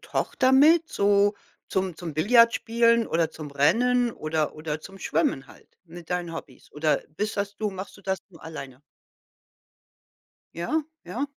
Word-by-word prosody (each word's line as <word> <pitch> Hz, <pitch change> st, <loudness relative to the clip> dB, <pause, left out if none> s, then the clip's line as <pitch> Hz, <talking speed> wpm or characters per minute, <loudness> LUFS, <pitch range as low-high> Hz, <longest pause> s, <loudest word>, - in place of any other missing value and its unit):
Tochter 260 Hz, 0 st, 0 dB
mit, 320 Hz, +5 st, +6 dB
so 205 Hz, -2 st, +3 dB, 0.3 s
zum 190 Hz, -2 st, -1 dB
zum 165 Hz, -4 st, -6 dB
Billard 230 Hz, +8 st, +5 dB
spielen 230 Hz, 0 st, +2 dB
oder 165 Hz, -1 st, 0 dB
zum 150 Hz, -2 st, -9 dB
Rennen 240 Hz, -, +2 dB
oder 155 Hz, -3 st, -2 dB
oder 155 Hz, 0 st, -4 dB
zum 195 Hz, +4 st, -12 dB
Schwimmen 155 Hz, -6 st, 0 dB
halt -, -, -18 dB, 0.2 s
mit 170 Hz, -1 st, -12 dB
deinen 175 Hz, -2 st, -2 dB
Hobbys? 140 Hz, -6 st, -10 dB
Oder 150 Hz, +1 st, +1 dB, 0.2 s
bist 215 Hz, +1 st, -2 dB
das 200 Hz, 0 st, -3 dB
du 215 Hz, -, -1 dB
machst 190 Hz, +1 st, -8 dB
du 200 Hz, -, -17 dB
das 190 Hz, 0 st, -1 dB
nur 165 Hz, -, -16 dB
alleine? 140 Hz, -5 st, -8 dB, 1.7 s
Ja, 300 Hz, -, -1 dB, 0.2 s
ja. 230 Hz, +11 st, -3 dB
190 Hz, 155 wpm, -26 LUFS, 160-230 Hz, 1.7 s, mit